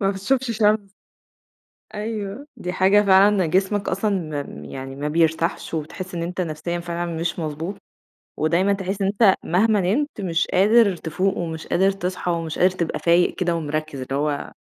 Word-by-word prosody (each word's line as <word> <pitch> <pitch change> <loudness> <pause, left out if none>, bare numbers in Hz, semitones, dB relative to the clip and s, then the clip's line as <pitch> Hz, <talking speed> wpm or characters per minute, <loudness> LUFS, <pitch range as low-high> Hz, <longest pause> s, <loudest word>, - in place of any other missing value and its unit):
ما 195 -1 +2
بتشوفش 245 +6 -1
شمس. 210 -2 +2 1.0
أيوه 210 +4 -5
دي 180 0 -4
حاجة 195 +3 +4
فعلًا 195 -1 +5
جسمك 190 +4 0
أصلًا 165 -9 -1
م 75 - -10
يعني 135 - -7
ما 145 +2 -3
بيرتاحش 165 +2 0
وبتحس 175 +4 -5
إن 170 - -2
أنت 180 +2 -3
نفسيًا 170 +1 -3
فعلًا 170 -1 -4
مش 170 +2 -2
مضبوط، 160 +4 -4 0.6
ودايمًا 175 +6 +2
تحس 195 +1 -3
إن 195 - +2
أنت 200 -1 +4
مهما 205 +4 +2
نمت 225 +6 -1
مش 170 -3 0
قادر 205 +1 +5
تفوق 185 +5 -1
ومش 160 -2 -4
قادر 195 +2 +3
تصحى، 180 -2 -3
ومش 165 -2 -3
قادر 185 +1 +5
تبقى 170 -3 -3
فايق 170 +1 +3
كده، 175 -2 0
ومركِّز، 155 -3 -3
اللي 135 +1 -4
هو 145 0 -2
180 Hz, 165 wpm, -22 LUFS, 165-200 Hz, 1.0 s, فعلًا